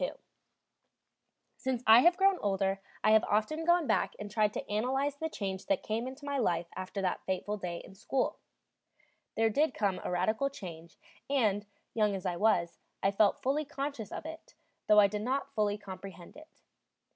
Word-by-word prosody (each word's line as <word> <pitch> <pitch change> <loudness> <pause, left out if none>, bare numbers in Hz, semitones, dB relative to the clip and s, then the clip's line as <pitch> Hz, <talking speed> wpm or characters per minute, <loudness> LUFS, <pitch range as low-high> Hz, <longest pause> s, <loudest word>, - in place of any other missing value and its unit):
II - - -1 1.4
Since 255 -2 -2
I 220 +2 +9
have 345 +6 +5
grown 390 -1 +4
older 195 -1 0 0.2
I 215 - +5
have 220 +1 +6
often 220 +10 0
gone 345 -1 +4
back - - +1
and 205 -1 -7
tried 210 -1 +2
to - - -4
analyze 265 +7 0
the 320 +2 -3
change 195 -8 -5
that 195 - +1
came 225 +3 -2
into 265 +3 -9
my 280 -1 -1
life 175 -7 +1
after 185 +1 -4
that 185 - -1
fateful 190 +2 -1
day 180 -4 -5
in - - -13
school. 250 +7 -1 1.0
There 225 0 +2
did 290 +4 +1
come 195 -3 0
a - - -3
radical 220 +9 +1
change, 170 -9 -10 0.3
and, 215 -7 +1 0.3
young 210 -3 +2
as 190 - -6
I 175 - 0
was, 175 -5 +2 0.2
I 195 - +3
felt 200 0 +2
fully 280 +4 +1
conscious 280 -6 -5
of - - -6
it, 320 +1 -9 0.3
though 210 0 +7
I 205 - +8
did 205 +1 -1
not 260 +5 -2
fully 210 -1 +1
comprehend 190 -3 -10
it. 310 +1 -16
215 Hz, 180 wpm, -31 LUFS, 195-275 Hz, 1.4 s, I